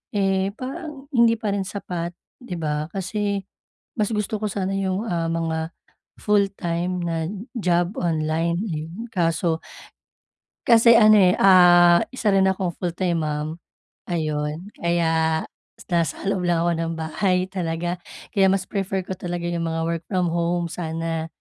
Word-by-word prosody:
eh, 195 -1 +1
parang 280 +2 -7
hindi 235 -3 +4
pa 220 -2 -2
rin 200 -1 -2
sapat, 175 -4 -5 0.2
di 245 -8 -6
ba? 150 -2 -2
Kasi 200 +2 -2 0.6
mas 210 - +2
gusto 210 0 -2
ko 215 - -1
sana 195 -1 -2
yung, 195 +1 -1
ah, 170 -4 -1
mga 165 0 -2 0.4
full 205 -1 +3
time 175 +1 -2
na 165 -2 -2 0.3
job 175 0 +1
online. 165 0 0
Hmm, 165 +2 -5
kaso 165 -2 0 1.1
kasi 230 0 +7
ano, 215 -1 +7
eh, 180 0 +5
ah, 175 -2 +7
isa 240 -5 0
rin 190 0 +4
akong 185 -2 -2
full-time 175 -1 -1
mom, 150 0 -2 0.6
ayon. 155 +1 -2
Kaya, 165 -2 +1 0.5
nasa 170 -3 0
loob 195 -2 0
lang 170 -1 +2
ako 175 - +2
ng 165 0 -2
bahay 180 +3 0
talaga, 175 -1 -2 0.4
kaya 195 -1 +5
mas 195 -1 +1
prefer 195 -1 -2
ko 190 - -4
talaga 175 -1 -4
yung 170 -1 -2
mga 165 0 -2
work 170 0 -2
from 185 -3 +1
home 170 0 0
sana. 165 -1 -3
175 Hz, 145 wpm, -23 LUFS, 165-195 Hz, 1.1 s, kasi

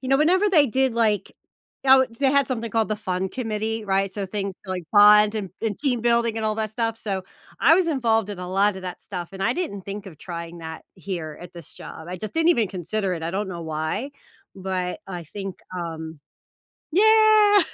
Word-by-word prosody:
you 260 - -6
know 270 - +5
whenever 370 +7 +3
they 310 -7 +5
did, 265 +1 +1
like 215 -4 +1 0.5
oh, 265 -1 +6
they 270 -2 +4
had 280 -1 +3
something 230 -3 -3
called 225 0 +1
the 215 - 0
fun 190 -2 -2
committee, 225 -1 -3
right? 195 -1 0
So 205 - -3
things 195 0 -4
like 185 -2 -4
bond 210 0 +7
and 200 -4 -4
and 220 -3 -2
team 255 -5 0
building 235 -1 +2
and 220 -1 -1
all 215 - 0
that 220 -1 -2
stuff, 225 0 -2
so, 195 -4 -3 0.4
I 325 - +7
was 355 -1 +2
involved 225 -8 +1
in 200 - -6
a 180 0 -6
lotta 195 +1 +1
that 185 -1 -7
stuff, 180 -3 -6
and 195 0 -6
I 230 - +2
didn't 250 - -4
think 200 +1 -7
of 160 -6 -11
trying 170 -1 -7
that 160 -1 -8
here 170 -5 -6
at 175 0 -10
this 170 -4 -12
job; 160 - -10
I 180 - -5
just 215 +4 -7
didn't 325 +1 +4
even 230 - +2
consider 195 +2 -2
it, 165 - -6
I 165 - -2
don't 195 +2 -2
know 170 -2 -6
why, 160 - -3 0.4
but 185 -1 -3
I 175 -3 -6
think, 195 +3 -7 0.2
um 160 -3 -6 0.7
Yeah. 430 +1 +6
205 Hz, 210 wpm, -24 LUFS, 185-240 Hz, 0.7 s, bond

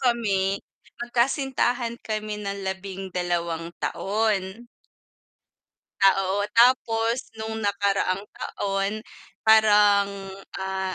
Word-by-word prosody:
kami, 205 -6 +1 0.5
magkasintahan 245 -1 0
kami 215 -1 -4
ng 200 -1 -4
12 185 -3 -3 0.2
taon. 210 +1 -1 1.4
Ah, 195 0 +7
oo. 200 +2 0
Tapos 230 -1 +4 0.2
nung 220 0 -4
nakaraang 200 -2 0
taon 200 +2 -3 0.4
parang 210 -2 +6 0.5
ah, 190 0 -3
205 Hz, 75 wpm, -25 LUFS, 195-225 Hz, 1.4 s, Ah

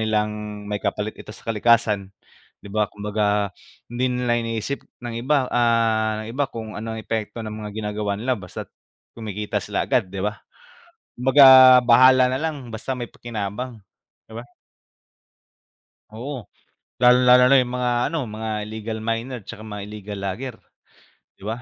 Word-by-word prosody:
nilang 105 -1 -2
may 105 0 -4
kapalit 105 +1 -2
ito - - -13
sa - - -16
kalikasan, 105 -3 +2 0.6
'di 100 - -10
ba? 105 -1 +1
Kumbaga 105 -1 -1 0.4
hindi 125 +1 0
nila 125 -1 0
iniisip 115 +4 -3 0.2
ng 120 -1 -5
iba, 135 +1 +2
ah, 110 -2 +2
iba 130 +5 -2
kung 110 -2 -7
ano 110 +2 -5
epekto 110 +1 -4
ng 110 - -6
mga 105 -1 -6
ginagawa 105 -1 -2
nila. 120 0 -2
Basta 90 - -7 0.5
kumikita 105 -2 -4
sila - - -2
agad, 95 - +1
'di 95 +1 -5
ba? 105 0 -3 0.8
Kumbaga 135 +3 +6 0.4
bahala 130 +1 +6
na 130 - -1
lang 145 -4 -4
basta 110 +3 -5
may 125 -2 -5
pakinabang, 115 +1 -6 0.5
'di 110 - -10
ba? 120 - -7 1.7
Oo, 120 -1 -7 0.5
lalong-lalo 125 +1 +6
na 140 - +7
'yung 125 -1 0
mga 125 -1 0 0.2
ano, 165 +3 -2
mga 110 +1 -5
illegal 110 +1 -5
miner, 115 +2 -3
tsaka 110 +2 -10
mga 105 -2 -6
illegal 105 -1 -7
logger, 115 +6 -4 0.8
'di 95 - -13
ba? 115 +3 -4
110 Hz, 145 wpm, -22 LUFS, 105-125 Hz, 1.7 s, na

